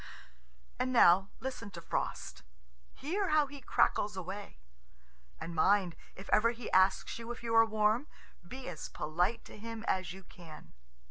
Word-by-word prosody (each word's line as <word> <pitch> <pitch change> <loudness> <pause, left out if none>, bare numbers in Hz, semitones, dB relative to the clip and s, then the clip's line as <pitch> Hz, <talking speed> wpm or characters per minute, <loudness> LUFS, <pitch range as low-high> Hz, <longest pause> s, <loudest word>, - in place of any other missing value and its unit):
And 255 - 0
now, 195 -5 +6
listen 250 -4 -5
to 180 -3 -9
Frost. 65 - -4 0.5
Hear 375 +7 -2
how 305 -1 +4
he 280 0 -10
crackles 210 -4 +1
away! 185 - -6 0.8
And 170 - -6
mind, 185 +1 +3 0.2
if 195 - -10
ever 225 +2 +5
he 235 -1 -6
asks 190 +4 +3
you 230 +1 -6
if 240 - -8
you 230 -1 -2
are 225 0 +7
warm, 220 +5 +1 0.4
be 260 +6 -8
as 175 -4 -6
polite 180 +9 -1
to - - -12
him 225 +1 -7
as 185 -3 0
you 190 +1 -10
can. 170 -4 -13
210 Hz, 155 wpm, -32 LUFS, 185-235 Hz, 0.8 s, are